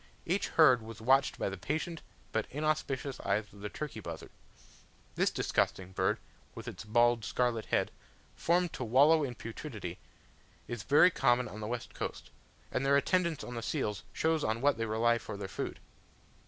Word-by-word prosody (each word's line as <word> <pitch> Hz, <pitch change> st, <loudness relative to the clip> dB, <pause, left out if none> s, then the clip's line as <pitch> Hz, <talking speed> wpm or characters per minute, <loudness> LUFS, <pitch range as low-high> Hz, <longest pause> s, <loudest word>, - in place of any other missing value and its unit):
Each 185 Hz, +4 st, 0 dB
herd 130 Hz, -7 st, +6 dB
was 110 Hz, 0 st, -9 dB
watched 135 Hz, +5 st, +3 dB
by -, -, -1 dB
the 95 Hz, -1 st, -7 dB
patient 160 Hz, -, -3 dB, 0.3 s
but 110 Hz, -1 st, -1 dB
inauspicious 140 Hz, -2 st, -1 dB
eyes 105 Hz, +1 st, -1 dB
of 100 Hz, -, -14 dB
the 105 Hz, +1 st, -5 dB
turkey 150 Hz, -4 st, -5 dB
buzzard. 85 Hz, -5 st, -7 dB, 0.8 s
This -, -, +2 dB
disgusting 95 Hz, 0 st, 0 dB
bird, 95 Hz, 0 st, +1 dB, 0.4 s
with -, -, -8 dB
its -, -, -6 dB
bald 120 Hz, +1 st, +3 dB
scarlet 115 Hz, +1 st, 0 dB
head, -, -, +1 dB, 0.4 s
formed 175 Hz, 0 st, +1 dB
to -, -, -4 dB
wallow 145 Hz, +7 st, +5 dB
in 125 Hz, -3 st, -3 dB
putridity, 110 Hz, -, -7 dB, 0.7 s
is 120 Hz, -3 st, -4 dB
very 150 Hz, -, +6 dB
common 125 Hz, -4 st, +2 dB
on 105 Hz, 0 st, -8 dB
the 105 Hz, -, -4 dB
west 120 Hz, +1 st, -4 dB
coast, -, -, -5 dB, 0.4 s
and 130 Hz, -, 0 dB
their 140 Hz, +1 st, +5 dB
attendance 170 Hz, +1 st, +1 dB
on 120 Hz, -, -7 dB
the 115 Hz, -, -4 dB
seals 110 Hz, -6 st, -2 dB
shows 160 Hz, -1 st, +1 dB
on 110 Hz, +1 st, 0 dB
what 140 Hz, -2 st, +2 dB
they 115 Hz, -, 0 dB
rely 115 Hz, +2 st, +2 dB
for 105 Hz, -, -7 dB
their 100 Hz, -1 st, -5 dB
food. 95 Hz, -, -5 dB
120 Hz, 175 wpm, -32 LUFS, 110-145 Hz, 0.8 s, herd